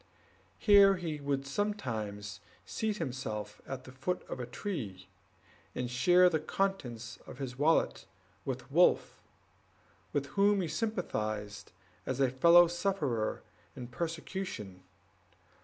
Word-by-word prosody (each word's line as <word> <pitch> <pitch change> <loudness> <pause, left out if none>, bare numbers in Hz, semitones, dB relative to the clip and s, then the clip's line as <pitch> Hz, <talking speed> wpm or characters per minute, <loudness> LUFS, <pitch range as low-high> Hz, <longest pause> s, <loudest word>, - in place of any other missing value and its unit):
Here 200 -2 +7
he 165 -4 -4
would 140 -1 -1
sometimes 110 - -3 0.3
seat 220 -2 -2
himself 110 - -4
at 130 -1 -5
the 130 - -11
foot 135 +8 -3
of - - -6
a 120 - -4
tree, 115 - -5 0.7
and 125 -1 -3
share 175 +9 +5
the 160 -3 +2
contents 125 - -3
of - - -9
his 130 -2 -6
wallet 160 +3 +2 0.4
with - - -5
Wolf, - - +3 0.9
with 140 -1 0
whom 200 0 +4
he 175 - -1
sympathized 110 - -3 0.4
as 130 0 -2
a 135 -2 +3
fellow 170 +6 +7
sufferer 165 - -1 0.3
in 125 -2 -7
persecution. 160 - -5
135 Hz, 120 wpm, -32 LUFS, 120-180 Hz, 0.9 s, Here